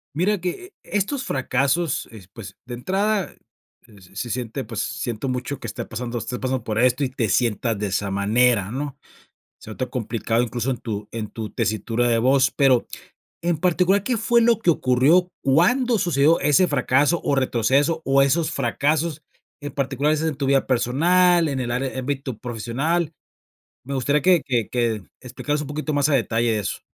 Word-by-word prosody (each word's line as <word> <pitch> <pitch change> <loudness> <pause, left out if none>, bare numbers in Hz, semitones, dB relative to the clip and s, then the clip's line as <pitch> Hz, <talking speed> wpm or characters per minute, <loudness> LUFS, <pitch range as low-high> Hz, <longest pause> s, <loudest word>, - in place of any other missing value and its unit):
Mira 195 +6 +1
que 365 - -5
e 205 - -2
estos 265 +7 -2
fracasos, 135 +4 0
es 100 -5 -13
pues, 95 -3 -11
de 120 - -6
entrada, 195 - -1 0.5
eh, 105 -4 -18
se 120 +4 -4
siente, 120 +2 -3
pues 115 -3 -5
siento 120 +2 -3
mucho 125 +3 -3
que - - -8
esté 105 - -5
pasando 120 +1 -4
estés 125 +2 -5
pasando 130 -2 -2
por 110 -1 -2
esto 125 +3 +2
y 135 - +1
te 120 -6 -2
sientas 115 -1 +1
de 105 - -2
esa 100 0 -2
manera, 105 +1 +2
¿no? 140 +2 -5 0.6
Se - - -13
nota 130 +4 -3
complicado, 115 -1 -1
incluso, 120 +2 -2
en 125 - -2
tu 105 -3 -5
en 110 -2 -4
tu 110 -2 -6
tesitura 115 +2 -1
de 115 - +3
voz, 130 +3 +3
pero 130 -4 +3 0.6
en 170 -1 0
particular, 180 +4 +2
¿qué 240 +1 0
fue 235 +2 +3
lo 230 -1 +3
que 180 - +1
ocurrió? 155 +5 +3
¿Cuándo 225 - +3
sucedió 165 -4 +3
ese 150 +5 +4
fracaso 145 +3 +2
o 140 - +1
retroceso, 135 +5 +1
o 135 +1 +3
esos 155 +4 +2
fracasos 150 +4 -1 0.4
en 145 0 -5
particular? 140 +1 0
¿Es 155 0 0
es 160 - 0
en 155 - -2
tu 140 0 -3
vida 135 0 +2
personal, 170 +8 +3
en 135 -3 -2
el 120 -1 -3
are 130 +2 -2
ámbito 130 -2 -3
profesional? 135 +9 -2 0.7
Me 140 - -6
gustaría 140 +3 +1
que 180 0 +4
que 120 -6 -1
que 115 -4 -1 0.2
explicaras 145 +4 -3
un 145 - -7
poquito 150 +1 -3
más 145 +1 +2
a 145 - +3
detalle 115 -2 +1
de 110 - 0
eso. 100 - -4
135 Hz, 185 wpm, -22 LUFS, 120-155 Hz, 0.7 s, ese